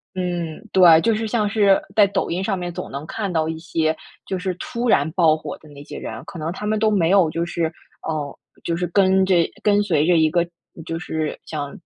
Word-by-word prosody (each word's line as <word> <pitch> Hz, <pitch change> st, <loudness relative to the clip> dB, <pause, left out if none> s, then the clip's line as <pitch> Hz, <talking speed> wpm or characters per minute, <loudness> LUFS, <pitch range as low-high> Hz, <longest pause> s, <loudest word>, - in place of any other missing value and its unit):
嗯， 175 Hz, -3 st, -3 dB
对， 175 Hz, -4 st, +7 dB
就 225 Hz, +2 st, +2 dB
是 220 Hz, +1 st, -2 dB
像 215 Hz, -2 st, 0 dB
是 200 Hz, -2 st, +4 dB, 0.2 s
在 210 Hz, -, +7 dB
抖 200 Hz, -, -2 dB
音 185 Hz, +3 st, -1 dB
上 195 Hz, -1 st, -1 dB
面 175 Hz, -1 st, -4 dB
总 -, -, -6 dB
能 140 Hz, +2 st, -6 dB
看 200 Hz, -1 st, -3 dB
到 160 Hz, -2 st, 0 dB
一 160 Hz, -, -4 dB
些， 160 Hz, -2 st, -1 dB, 0.3 s
就 190 Hz, -, -2 dB
是 185 Hz, 0 st, -2 dB
突 235 Hz, +6 st, -4 dB
然 145 Hz, -5 st, +3 dB
爆 165 Hz, -4 st, +4 dB
火 -, -, -7 dB
的 155 Hz, -, -17 dB
那 145 Hz, -1 st, -12 dB
些 145 Hz, -, -9 dB
人， 115 Hz, +2 st, -7 dB
可 195 Hz, -4 st, -9 dB
能 155 Hz, +2 st, -3 dB
他 200 Hz, +3 st, -6 dB
们 215 Hz, +1 st, +1 dB
都 215 Hz, 0 st, +2 dB
没 175 Hz, -5 st, +2 dB
有 190 Hz, -5 st, +5 dB
就 170 Hz, 0 st, -1 dB
是， 170 Hz, -1 st, -1 dB, 0.4 s
嗯， 150 Hz, -3 st, -3 dB, 0.3 s
就 170 Hz, -, -1 dB
是 180 Hz, -, -1 dB
跟 190 Hz, +1 st, +3 dB
着 190 Hz, -1 st, +3 dB, 0.3 s
跟 205 Hz, -1 st, +4 dB
随 160 Hz, -7 st, +1 dB
着 175 Hz, 0 st, +4 dB
一 160 Hz, -1 st, +4 dB
个 170 Hz, +1 st, +1 dB, 0.4 s
就 165 Hz, -, -4 dB
是 160 Hz, -2 st, -3 dB
像 145 Hz, -3 st, -5 dB
175 Hz, 250 characters per minute, -21 LUFS, 160-195 Hz, 0.4 s, 对